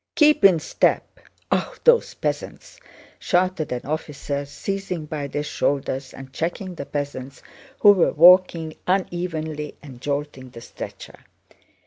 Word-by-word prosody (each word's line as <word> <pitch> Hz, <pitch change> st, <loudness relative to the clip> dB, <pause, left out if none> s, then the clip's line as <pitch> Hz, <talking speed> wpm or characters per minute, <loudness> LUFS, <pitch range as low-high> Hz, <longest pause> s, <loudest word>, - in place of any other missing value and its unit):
"Keep 300 Hz, -6 st, +4 dB
in 190 Hz, -3 st, +7 dB
step! 155 Hz, -, 0 dB, 0.3 s
Ah... -, -, 0 dB
those 480 Hz, -1 st, +4 dB
peasants!" -, -, -5 dB, 0.4 s
shouted 180 Hz, -4 st, 0 dB
an 125 Hz, -1 st, -4 dB
officer, 145 Hz, -1 st, -4 dB
seizing 185 Hz, +2 st, -4 dB
by 150 Hz, -2 st, -4 dB
their 145 Hz, +1 st, -3 dB
shoulders 140 Hz, -2 st, -2 dB
and 135 Hz, 0 st, -12 dB
checking 175 Hz, +5 st, -3 dB
the 140 Hz, -5 st, -7 dB
peasants, 140 Hz, -2 st, -5 dB, 0.4 s
who 205 Hz, -, +9 dB
were 190 Hz, -4 st, +3 dB
walking 170 Hz, -1 st, +5 dB
unevenly 165 Hz, -5 st, -2 dB
and 130 Hz, -4 st, -12 dB
jolting 140 Hz, -2 st, -4 dB
the 115 Hz, -1 st, -12 dB
stretcher. -, -, -9 dB
155 Hz, 125 wpm, -23 LUFS, 140-180 Hz, 0.4 s, who